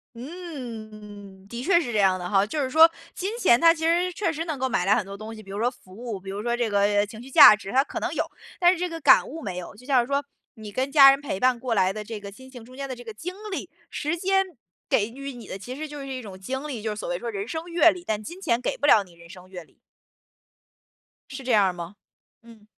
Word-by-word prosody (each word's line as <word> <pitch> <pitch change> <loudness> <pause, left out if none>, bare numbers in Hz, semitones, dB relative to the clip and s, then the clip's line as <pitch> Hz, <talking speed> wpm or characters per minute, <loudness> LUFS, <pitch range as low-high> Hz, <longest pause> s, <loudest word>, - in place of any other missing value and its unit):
嗯， 215 - -9
的 235 +2 -6
确 345 +1 +4
是 245 -8 -4
这 215 - 0
样 190 -2 +3
的 180 0 -5
哈。 195 0 +3
就 290 +8 -3
是 265 - -1
说 320 +4 +7 0.2
金 380 +2 -3
钱 240 - +4
它 330 0 +7
其 320 -1 -5
实 350 +2 +2
确 340 -2 -1
实 325 +1 -4
能 310 -4 -4
够 260 0 0
买 180 - 0
来 200 - +4
很 210 -5 -1
多 195 - -8
东 215 +2 -8
西， 215 - -11
比 195 - -14
如 200 - -5
说 245 +2 +2
服 185 -7 -18
务， 230 -2 -6
比 195 +1 -9
如 200 +2 -5
说 240 0 -1
这 240 -2 0
个 205 -1 +1
呃 205 0 +2
情 220 +2 -11
绪 265 - -12
价 215 - +10
值， 205 -2 -7
它 270 +2 +3
可 - - -6
能 - - -2
有， - - 0 0.3
但 355 -1 +5
是 370 - -3
这 360 0 -1
个 330 -1 -7
感 - - +6
悟 320 +4 -7
没 185 -4 -5
有。 180 - -8
就 250 - -16
像 270 -3 +4
是 235 - -2
说， 280 0 0 0.3
你 215 -2 -10
跟 260 +5 -1
家 275 -2 +9
人 275 +1 +1
陪 255 -9 -4
伴 255 +1 +3
过 250 -3 -1
来 190 0 +3
的 215 +1 -6
这 215 0 -7
个 200 -1 -10
亲 260 +5 -14
情 245 -3 -11
中 255 +2 -15
间 275 0 -5
的 255 - -5
这 245 - -12
个 225 - -8
经 345 +12 -6 0.2
历， - - -5 0.2
时 305 +3 -3
间 385 +2 +2 0.4
给 205 - +2
予 275 +2 -7
你 235 -4 -11
的， - - -6
其 250 +7 -8
实 310 - -5
就 295 -1 -9
是 275 - -7
一 260 -1 -5
种 200 -5 -10
经 265 +8 -4
历， 250 -8 -5
就 220 - -2
是 210 - -5
所 - - -6
谓 175 - -1
说 235 +6 -5
人 200 -1 -5
生 320 +6 -5
阅 340 -1 +4
历， 360 - -9
但 215 -1 -2
金 345 - -9
钱 235 -9 +1
给 - - -2
不 290 - 0
了 215 -8 +6
你 175 - -19
人 170 0 -16
生 185 -1 -13
阅 180 -2 -9
历。 - - -24 1.6
是 265 -1 -8
这 250 - 0
样 210 -2 +5
儿 185 - 0
吗？ 175 +2 -8 0.5
嗯。 230 -2 -17
240 Hz, 310 characters per minute, -25 LUFS, 205-290 Hz, 1.6 s, 价